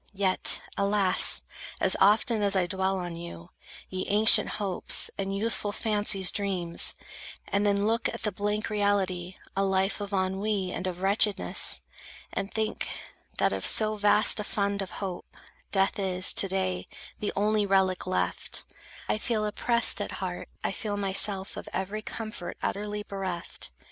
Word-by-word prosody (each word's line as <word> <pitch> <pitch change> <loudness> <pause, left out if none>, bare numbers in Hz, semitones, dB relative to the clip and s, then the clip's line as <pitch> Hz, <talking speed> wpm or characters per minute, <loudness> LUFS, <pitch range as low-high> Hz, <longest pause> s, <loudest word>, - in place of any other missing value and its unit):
Yet, 190 -1 +2 0.2
Alas! 200 -2 +2 0.4
as 190 - +3
often 215 +3 +4
as 200 -1 +4
I 185 -2 +2
dwell 190 +1 -1
on 175 -2 -5
you, 125 - -9 0.4
Ye 185 0 -5
ancient 210 +1 +7
hopes, 195 -4 +2
and 195 0 -3
youthful 215 -1 -2
fancy's 205 -3 +2
dreams, 185 -4 -1 0.5
And 200 +1 +1
then 200 0 +1
look 225 +1 +1
at - - -7
the 210 - 0
blank 210 +3 -2
reality, 190 -3 0 0.2
A 195 - +1
life 195 +1 0
of 200 0 -5
ennui 190 0 -1
and 185 - -4
of 180 0 -5
wretchedness; 200 +1 +1 0.5
And 195 +1 -3
think, 220 -1 -2 0.5
that - - +2
of - - -4
so 215 -1 +6
vast 210 +1 +4
a - - -2
fund 200 -1 -1
of 190 - -5 0.2
hope, 180 -2 -8 0.3
Death 195 +2 +1
is, 185 -1 +3
to 195 - +4
day, 185 -1 -2 0.3
the 210 - -2
only 210 0 +1
relic 190 -2 +1
left, 185 - -2 0.4
I - - 0
feel 215 -1 -1
oppressed 235 +3 +1
at - - -4
heart, - - -5
I - - 0
feel 210 -3 -4
myself 195 0 +1
Of - - -8
every 195 +3 -3
comfort 215 -4 -7
utterly 210 +1 -3
bereft. 190 - -4
200 Hz, 155 wpm, -27 LUFS, 190-210 Hz, 0.5 s, ancient